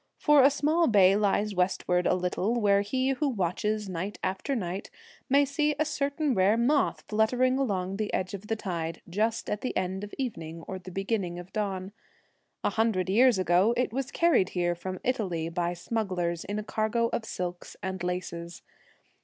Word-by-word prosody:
For 295 -2 +5
a 270 - +7
small 310 +4 +2
bay 195 -4 +6
lies 205 0 +1
westward 180 -1 +1
a - - +3
little, 185 +6 0
where 200 -2 +4
he 255 +6 0
who 275 +2 +1
watches 210 0 -1
night 185 +3 -4
after 190 +9 -1
night 190 -3 -4 0.4
may 280 +2 +5
see 295 +2 0
a 310 - +1
certain 285 -1 0
rare 195 +2 +3
moth 275 +5 +2
fluttering 250 +5 +2
along 195 -7 -1
the 215 -1 -2
edge 185 +1 -2
of 200 +1 -7
the 225 - 0
tide, 170 -6 -4
just 220 +6 -1
at 210 - -2
the 255 - -2
end 185 +1 -2
of 205 - -7
evening 165 -11 -5
or 190 - -5
the 185 0 -10
beginning 195 -2 -2
of 175 +1 -10
dawn. 195 -2 -2 0.7
A - - +1
hundred 215 -5 +1
years 245 +2 +5
ago 185 +5 +3
it 250 -2 0
was 270 +1 -2
carried 320 - +3
here 175 0 +2
from 185 +1 -6
Italy 185 -10 -1
by 175 +1 -1
smugglers 180 -4 -2
in 205 +1 -3
a 215 - -3
cargo 220 +2 0
of 235 - -1
silks 180 -4 -5
and 190 -1 -3
laces. 170 -1 -4
200 Hz, 180 wpm, -28 LUFS, 180-240 Hz, 0.7 s, a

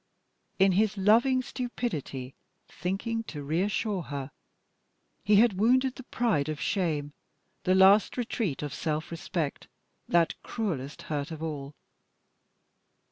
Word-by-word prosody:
In 195 0 +5
his 210 +2 +2
loving 235 +6 +4
stupidity, 160 - -4 0.3
thinking 220 +5 -3
to 145 -7 -7
reassure 190 +6 0
her, 140 -3 -6 0.9
he 210 - +4
had 205 -2 +4
wounded 255 +4 +3
the 260 - -9
pride 225 - 0
of 155 -1 -3
shame, 150 -4 -1 0.5
the 185 - +4
last 195 +5 +6
retreat 220 - -2
of 145 -2 -4
self 155 +2 -2
respect, 165 -2 -3 0.4
that 170 -1 +3
cruellest 155 - -4
hurt 145 -2 -3
of 160 -1 -6
all. 145 -3 -5
185 Hz, 120 wpm, -28 LUFS, 150-220 Hz, 0.9 s, last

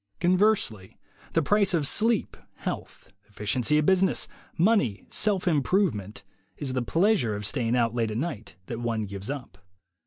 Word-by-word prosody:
Conversely, 180 - +2 0.4
the 165 - +2
price 200 +2 +3
of 155 -4 0
sleep, 225 - +1 0.2
health, - - -6 0.2
efficiency 115 +8 0
at 150 - +2
business, 190 +1 +3 0.3
money, 170 - +2
self 205 -4 +1
improvement, 145 - 0 0.3
is 135 -3 -3
the 130 - 0
pleasure 165 - +1
of 105 0 -5
staying 120 +1 0
out 115 -2 +1
late 115 -2 0
at 110 - -3
night 115 -8 -4
that 115 +3 -5
one 115 -2 -2
gives 100 +2 -7
up. 125 -10 -6
135 Hz, 150 wpm, -26 LUFS, -, 0.4 s, price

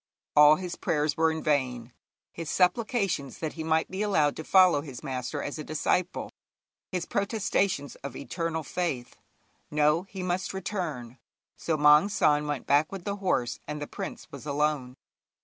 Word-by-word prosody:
All 150 +1 +8
his 180 +1 -5
prayers 150 -1 0
were 160 0 +3
in 160 0 -3
vain; 125 -5 0 0.4
his 165 -2 -6
supplications 195 - +1
that 160 -2 -4
he 160 - -5
might 160 0 +1
be 190 +2 -3
allowed 155 -9 +2
to 160 - -5
follow 185 -4 +5
his 135 -5 -9
master 130 +1 -3
as 145 - -5
a - - -4
disciple; 170 +4 -1 0.6
his 180 -2 -2
protestations 200 - 0
of 140 - -8
eternal 165 +1 -3
faith. 140 -6 -3 0.5
No, 150 +2 +3
he 190 -2 -6
must 185 +1 -2
return; 175 - -4 0.4
so 160 -2 -1
Maung 150 +5 +6
San 150 -6 +2
went 145 -3 -3
back 145 +2 +3
with 195 -2 -6
the 200 +1 -3
horse, 155 -11 0
and 150 0 -4
the 145 - -4
prince - - -7
was 140 +1 -9
alone. 145 -3 0
155 Hz, 165 wpm, -28 LUFS, 145-180 Hz, 0.6 s, All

